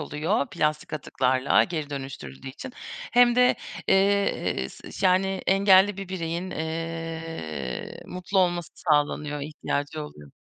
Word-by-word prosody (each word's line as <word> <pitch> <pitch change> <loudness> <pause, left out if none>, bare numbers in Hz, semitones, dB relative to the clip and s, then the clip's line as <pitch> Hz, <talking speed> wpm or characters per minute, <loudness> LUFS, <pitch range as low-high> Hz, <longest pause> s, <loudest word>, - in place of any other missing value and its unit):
oluyor 150 +2 0
plastik 150 0 -1
atıklarla 130 -2 +2
geri 155 -4 -4
dönüştürüldüğü 135 - -7
için 250 - -8 0.4
hem 245 0 +6
de, 250 0 +5 0.3
eee, 195 - +2
s - - -12
ş 190 - +1
yani 190 +1 +2
engelli 195 0 +5
bir 195 -1 -6
bireyin, 175 0 -3
eee, 160 - -5
mutlu 185 +2 -2
olması 175 -3 +1
sağlanıyor, 150 -1 +1
ihtiyacı 150 +1 -3
oluyor. 75 - -12
165 Hz, 120 wpm, -26 LUFS, 145-190 Hz, 0.4 s, hem